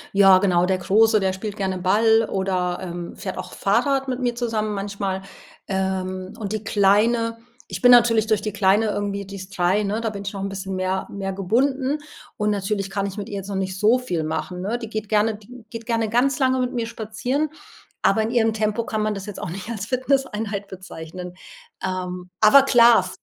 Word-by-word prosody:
Ja 195 -1 +7
genau, 180 -2 +2
der 190 0 +1
Große, 215 +4 +4
der 190 -1 0
spielt 200 +2 -5
gerne 190 -2 -2
Ball 220 +4 +3
oder, 185 -2 -1
ähm, 175 -1 -6
fährt 190 - -5
auch - - -7
Fahrrad 270 +7 +1
mit 255 -1 -2
mir 245 -2 -1
zusammen 225 -3 -1
manchmal, 195 -1 -3 0.4
ähm, 185 -1 -2
und 205 -1 -4
die 215 -1 -3
Kleine 220 +3 +2 0.3
ich - - -5
bin 245 - +6
natürlich 230 -2 +5
durch 215 -2 +2
die 210 -1 -4
Kleine 205 +2 +3
irgendwie 200 -1 -2
die 195 +1 -8
ist 190 +1 -10
3 180 +3 +2
ne, 210 +2 -1
da 225 -1 -2
bin 200 -1 -6
ich 195 - -5
noch 195 - -5
'n 195 - -2
bisschen 195 0 -5
mehr 185 0 -1
mehr 195 -1 -4
gebunden 260 +9 0 0.4
und 210 0 +1
natürlich 195 -1 -2
kann 200 0 -1
ich 195 +1 -7
mit 205 -1 -5
ihr 205 - -5
jetzt 195 0 -6
noch 200 - -4
nicht 190 0 -3
so 220 +5 +4
viel 180 -11 -3
machen 180 +3 -4
ne? 210 +6 -2
Die 225 -2 -7
geht 215 -1 -4
gerne 215 +1 +2
die 235 +2 -14
geht 230 -1 -7
gerne 230 -2 0
ganz 250 +4 +2
lange 260 -1 +2
mit 250 0 -1
mir 235 -2 -1
spazieren, 235 +7 -2 0.5
aber 210 +3 +3
in 220 - -1
ihrem 225 -2 +2
Tempo 215 +1 -1
kann 215 -1 -2
man 210 0 0
das 195 -1 -6
jetzt 205 -2 -7
auch - - -4
nicht 185 +4 -7
als 215 -2 -5
Fitnesseinheit 230 -6 -1
bezeichnen. 180 -1 -9 0.5
Ähm, 180 -1 -4
aber 220 +6 +8
klar, 235 -7 +5
205 Hz, 210 wpm, -22 LUFS, 190-230 Hz, 0.5 s, aber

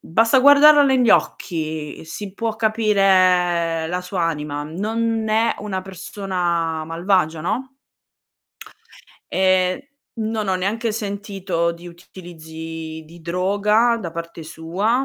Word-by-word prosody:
basta 225 +9 +3
guardarla 285 +2 +7
negli 260 -4 +3
occhi, 155 -4 -1
si 195 +4 -8
può 225 +1 -2
capire 185 -6 +2
la 180 +2 -2
sua 180 0 -3
anima, 150 -3 -2
non 220 +7 -2
è 225 +2 +2
una 190 -3 -4
persona 180 -4 -3
malvagia, 165 -1 0
no? 230 +10 -3 1.6
E 185 +6 +1 0.2
non 220 -2 -3
ho 190 - +2
neanche 220 +5 -1
sentito 200 -5 -2
di 170 +1 -12
utilizzi 160 -2 -9
di 170 +2 -15
droga 205 +7 +1
da 170 -5 -5
parte 170 0 -7
sua. 185 +11 -1
185 Hz, 110 wpm, -21 LUFS, 165-215 Hz, 1.6 s, guardarla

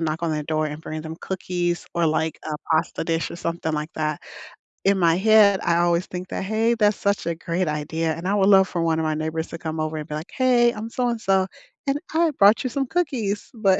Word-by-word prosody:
knock 160 +1 -2
on 165 - 0
their 150 -1 -1
door 155 0 0
and 150 +1 -6
bring 155 -1 -6
them 160 0 -7
cookies 175 -2 -2
or 170 -1 +2
like 160 +1 0
a 155 - -3 0.2
pasta 160 +1 +1
dish 165 0 -1
or - - -7
something 170 -2 -3
like 150 +1 -3
that. 155 -1 -2 0.7
In 195 0 +4
my 170 -2 +4
head, 205 0 +5
I 170 0 +2
always 175 +1 +2
think 180 0 -6
that, - - -3
"Hey, 220 +4 +1
that's 210 -3 +2
such 200 0 0
a 170 - 0
great 170 +1 -2
idea," 160 +2 -1
and 170 +3 -5
I 200 - +1
would 195 -1 +3
love 190 -1 +6
for 170 - -2
one 165 -1 +1
of - - 0
my 155 - +1
neighbors 160 +1 -3
to - - -6
come 160 -1 -4
over 155 0 -2
and 150 - -6
be 150 - -5
like, 155 +4 -7
"Hey, 245 -2 +4
I'm 220 +1 -6
so 245 +1 -1
and 235 -2 -3
so 190 -2 +2 0.4
and 275 - +2 0.2
I 330 -1 +3
brought 205 +5 +6
you 255 - -1
some 270 +1 -2
cookies." 245 - -2
But, 195 -5 +2
175 Hz, 250 wpm, -23 LUFS, 160-205 Hz, 0.7 s, love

